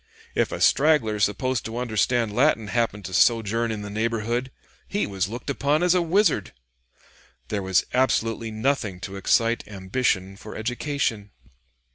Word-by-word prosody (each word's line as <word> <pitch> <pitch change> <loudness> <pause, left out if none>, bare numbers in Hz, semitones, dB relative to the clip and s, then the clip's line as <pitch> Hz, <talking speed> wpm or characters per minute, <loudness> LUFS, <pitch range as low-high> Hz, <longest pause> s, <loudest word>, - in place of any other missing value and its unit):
If - - +1
a - - -4
straggler 135 -8 +3
supposed 110 +5 0
to 110 +1 -5
understand 115 -1 0
Latin 125 -6 +2
happened 105 -2 -1
to 95 - -6
sojourn 115 +3 +2
in 105 -2 -4
the 100 - -6
neighborhood, 115 +3 -1 0.4
he 205 - -1
was 95 -1 -2
looked 120 +2 -7
upon 145 +3 +1
as 180 0 +4
a 180 - +3
wizard. 190 +6 +1 1.0
There 105 -2 -1
was 95 -1 +2
absolutely 115 -3 +1
nothing 110 -4 -1
to 100 0 -6
excite 115 +4 +2
ambition 95 -1 -1
for 105 - -10
education." 115 -2 -2
115 Hz, 145 wpm, -24 LUFS, 105-130 Hz, 1.0 s, as